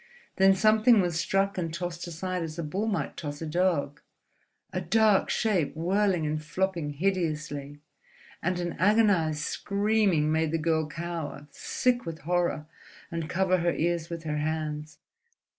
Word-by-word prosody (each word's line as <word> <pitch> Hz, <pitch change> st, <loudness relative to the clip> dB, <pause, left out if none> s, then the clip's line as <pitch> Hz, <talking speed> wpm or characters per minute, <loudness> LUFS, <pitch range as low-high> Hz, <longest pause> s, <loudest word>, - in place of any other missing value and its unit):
Then 190 Hz, 0 st, +6 dB
something 215 Hz, +3 st, +5 dB
was 175 Hz, -3 st, 0 dB
struck 195 Hz, +1 st, 0 dB
and 165 Hz, -2 st, -2 dB
tossed 175 Hz, +1 st, -4 dB
aside 180 Hz, +2 st, -3 dB
as 160 Hz, 0 st, -5 dB
a 170 Hz, -, -3 dB
bull 190 Hz, +9 st, -2 dB
might 210 Hz, -, -2 dB
toss 145 Hz, -2 st, -6 dB
a 165 Hz, -, -4 dB
dog—a 170 Hz, +1 st, -3 dB
dark 210 Hz, +3 st, +3 dB
shape 190 Hz, -11 st, +1 dB
whirling 185 Hz, 0 st, +1 dB
and 155 Hz, 0 st, -2 dB
flopping 170 Hz, -2 st, -2 dB
hideously; 155 Hz, -4 st, -2 dB, 0.6 s
and 185 Hz, -1 st, -1 dB
an 175 Hz, -1 st, -2 dB
agonized 185 Hz, -7 st, +3 dB
screaming 200 Hz, -6 st, +1 dB
made 160 Hz, 0 st, +1 dB
the 165 Hz, -, +1 dB
girl 160 Hz, -1 st, +1 dB
cower, 155 Hz, -3 st, -5 dB
sick 245 Hz, -, 0 dB
with 165 Hz, -1 st, -7 dB
horror, 175 Hz, -1 st, 0 dB, 0.5 s
and 165 Hz, -2 st, -4 dB
cover 185 Hz, 0 st, +2 dB
her 170 Hz, 0 st, +1 dB
ears 170 Hz, 0 st, -1 dB
with 170 Hz, -1 st, -6 dB
her 150 Hz, -1 st, -2 dB
hands. 155 Hz, 0 st, -3 dB
170 Hz, 145 wpm, -28 LUFS, 155-190 Hz, 0.6 s, Then